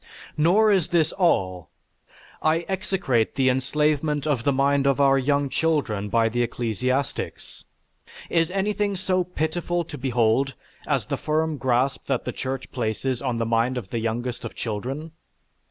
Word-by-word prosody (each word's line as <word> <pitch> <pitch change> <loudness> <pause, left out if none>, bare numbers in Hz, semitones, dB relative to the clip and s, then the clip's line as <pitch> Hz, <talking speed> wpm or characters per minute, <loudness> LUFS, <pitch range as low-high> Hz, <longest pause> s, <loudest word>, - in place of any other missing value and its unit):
Nor 195 +8 +4
is 190 -5 +3
this 170 -3 +2
all. 95 - +1 0.7
I 160 +2 +2
execrate 190 - 0
the 130 -1 +3
enslavement 150 +3 +1
of 140 -7 0
the 140 - +4
mind 140 +1 +2
of 140 0 +2
our 135 -1 +5
young 140 +1 +1
children 135 -10 0
by 115 +1 +3
the 120 +2 -1
ecclesiastics. 120 +3 -2 0.6
Is 165 -1 +2
anything 200 +1 0
so 185 0 +1
pitiful 175 0 -2
to 150 -3 -9
behold 125 +1 +1 0.3
as - - +1
the - - -2
firm 155 0 0
grasp 130 +1 0
that 135 -3 -1
the - - -2
Church 130 0 -4
places 120 +1 -2
on 125 -4 -1
the 115 - 0
mind 115 +3 +1
of 105 -6 -5
the 115 - -1
youngest 120 +2 -3
of - - -6
children? 130 +9 -4
135 Hz, 155 wpm, -24 LUFS, 120-160 Hz, 0.7 s, our